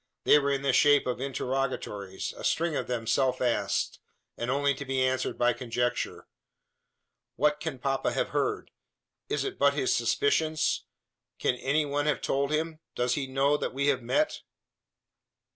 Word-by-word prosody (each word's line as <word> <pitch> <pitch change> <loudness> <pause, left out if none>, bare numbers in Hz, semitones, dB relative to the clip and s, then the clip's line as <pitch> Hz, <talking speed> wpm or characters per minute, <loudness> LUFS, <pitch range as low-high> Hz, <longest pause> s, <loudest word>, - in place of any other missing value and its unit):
They 150 - +6
were 140 -1 0
in 140 -1 0
the 135 -2 +2
shape 145 +1 +5
of 125 0 -2
interrogatories 130 -7 -3
a - - -10
string 165 -1 +1
of - - -2
them 120 -2 -2
self 130 +3 +1
asked, 115 -5 0 0.4
and 120 - -4
only 140 +1 +2
to 140 - -6
be 135 -1 0
answered 130 0 -1
by 120 0 +3
conjecture. 120 0 -2 1.1
"What 150 +3 +2
can 135 - -4
papa 135 +1 0
have - - 0
heard? - - -1 0.6
Is - - 0
it 400 -1 -5
but - - +4
his - - +1
suspicions? 160 - +1 0.5
Can - - +1
any 145 +4 +1
one 145 +1 -1
have 150 - +1
told 140 +1 0
him? 155 +1 -1 0.2
Does 125 0 +1
he 140 -3 -2
knew 140 +2 +2
that - - -3
we 140 +1 +2
have 130 -2 +1
met?" 300 - 0
135 Hz, 165 wpm, -28 LUFS, 125-145 Hz, 1.1 s, They